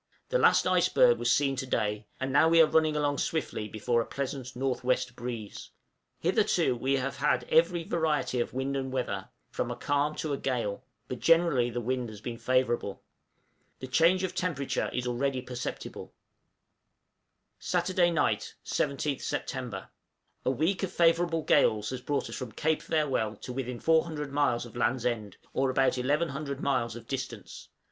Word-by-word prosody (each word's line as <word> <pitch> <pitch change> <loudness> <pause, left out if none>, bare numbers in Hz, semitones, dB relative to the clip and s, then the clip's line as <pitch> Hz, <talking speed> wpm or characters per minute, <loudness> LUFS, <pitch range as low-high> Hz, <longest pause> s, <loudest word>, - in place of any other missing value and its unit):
The - - +2
last - - +5
iceberg - - +4
was - - +2
seen 135 -2 +2
to 135 0 -3
day; 105 -3 -1
and 130 0 -2
now 160 +3 +5
we 165 0 +5
are 165 - +9
running 155 0 +2
along 145 -1 0
swiftly 150 -9 -2
before 115 +3 0
a - - -3
pleasant 135 -2 -4
N.W. 130 0 -1 0.3
breeze. 120 -4 -6 0.5
Hitherto - - +2
we 130 +3 0
have 135 +1 -2
had 125 -1 +1
every 170 +1 +4
variety 155 -6 0
of 120 - -1
wind 135 +2 -2
and 130 -1 -2
weather, 100 -7 -3 0.2
from - - -2
a - - -3
calm 145 +1 0
to 155 -2 -2
a 140 - -2
gale, 120 -6 -2 0.2
but 125 - -5
generally 165 -8 +4
the 120 +1 -3
wind 125 0 -2
has 105 -1 -10
been 115 +1 -6
favorable. 120 -4 0 0.7
The - - -7
change 165 +8 +3
of 185 -1 -2
temperature 170 -7 -1
is 125 - -2
already 130 +2 0
perceptible. 125 -1 -6
{VOYAGE - - -21
HOME.} - - -42 1.4
Saturday 180 -2 +1
night, 165 -2 0
17th 140 0 -1
Sept. 120 -8 -4 0.6
A - - +1
week 160 +9 0
of 190 -2 -2
favorable 170 -1 +2
gales 110 -8 +3
has 130 -1 -5
brought 140 +2 -1
us - - -6
from 125 -5 -6
Cape 160 0 0
Farewell 135 -9 0
to 125 - -8
within 125 -2 -4
400 160 -3 +1
miles 140 -5 +1
of 120 - -12
Land's 120 0 0
End, 110 -5 -2 0.2
or 135 0 +1
about 130 0 +2
1100 140 +1 -1
miles 125 -5 0
of 120 - -9
distance. 135 -2 -6
135 Hz, 170 wpm, -29 LUFS, 120-155 Hz, 1.4 s, are